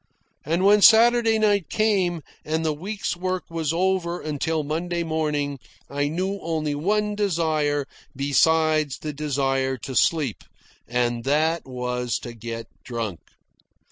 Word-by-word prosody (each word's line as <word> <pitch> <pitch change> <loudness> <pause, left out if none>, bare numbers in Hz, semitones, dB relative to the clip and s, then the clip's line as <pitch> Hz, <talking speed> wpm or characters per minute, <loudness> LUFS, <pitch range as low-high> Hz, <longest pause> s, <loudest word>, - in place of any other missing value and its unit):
And 170 +5 0
when 205 +1 +6
Saturday 230 +1 +6
night 205 -6 +2
came, 190 -7 +1 0.2
and 160 +1 -1
the 155 - +1
week's 195 +6 -4
work 185 +1 -2
was 160 -2 -1
over 175 0 0
until 155 +1 -2
Monday 170 +3 -2
morning, 150 -3 -1 0.3
I 145 +1 0
knew 185 +6 -2
only 155 -2 -2
one 210 +8 0
desire 155 -8 0 0.3
besides 155 +1 +2
the 150 -1 -5
desire 135 -2 0
to 130 +2 -7
sleep, 145 -3 +1 0.4
and 120 -1 0
that 155 +3 +1
was 125 -2 -2
to 120 - -7
get 115 0 -6 0.2
drunk. 115 -7 -4
155 Hz, 130 wpm, -24 LUFS, 140-180 Hz, 0.4 s, when